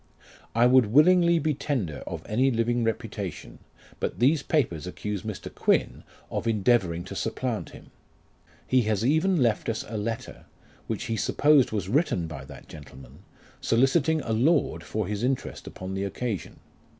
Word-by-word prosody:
I 115 +1 +5
would 125 -2 +5
willingly 170 - +5
be 155 -1 0
tender 125 - -2
of - - -5
any 125 +5 +2
living 120 0 0
reputation, 115 -1 -4 0.4
but - - -3
these 140 +5 +3
papers 90 - -1
accuse 105 +2 -4
Mr. 110 -2 -7
Q,uin - - +1 0.3
of - - -3
endeavouring 100 -6 +2
to 90 - -8
supplant - - -3
him. - - -14 0.7
He 130 -1 +3
has 110 +1 0
even 160 +7 +3
left 115 -1 0
us 110 -1 -3
a 110 - -5
letter, 115 +2 -5 0.4
which - - -3
he 115 - -2
supposed 145 +4 +3
was 100 -4 -2
written 115 - +1
by 75 -5 -8
that - - -12
gentleman, 70 -3 -13 0.4
soliciting 140 +6 +2
a 115 - -3
lord 145 +8 +2
for 110 -1 -3
his 105 +2 -3
interest 130 0 -2
upon 95 +1 -7
the 95 +1 -2
occasion. 105 +1 -4
115 Hz, 155 wpm, -26 LUFS, 100-135 Hz, 0.7 s, I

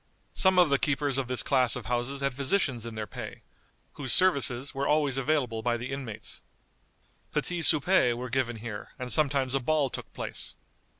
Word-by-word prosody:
Some 190 -1 +3
of 175 -5 +5
the 140 - +3
keepers 145 -2 0
of 130 - -3
this 125 0 0
class 130 -4 +2
of 125 - -6
houses 125 +4 -2
had 140 -1 0
physicians 135 - +1
in 115 - -8
their 110 -1 -4
pay, - - -9 0.5
whose 130 -3 -4
services 140 - +2
were 140 0 -2
always 150 -3 +2
available 135 -5 0
by 120 +1 0
the 120 +3 -6
inmates. 130 -6 -6 0.9
Petits 175 -2 +2
soupers 155 -5 +4
were 125 +2 -5
given 125 -2 0
here, 110 -2 -8
and 125 -2 -2
sometimes 135 -2 +1
a 135 - +2
ball 140 0 0
took - - -7
place. - - -7
135 Hz, 180 wpm, -28 LUFS, 120-145 Hz, 0.9 s, of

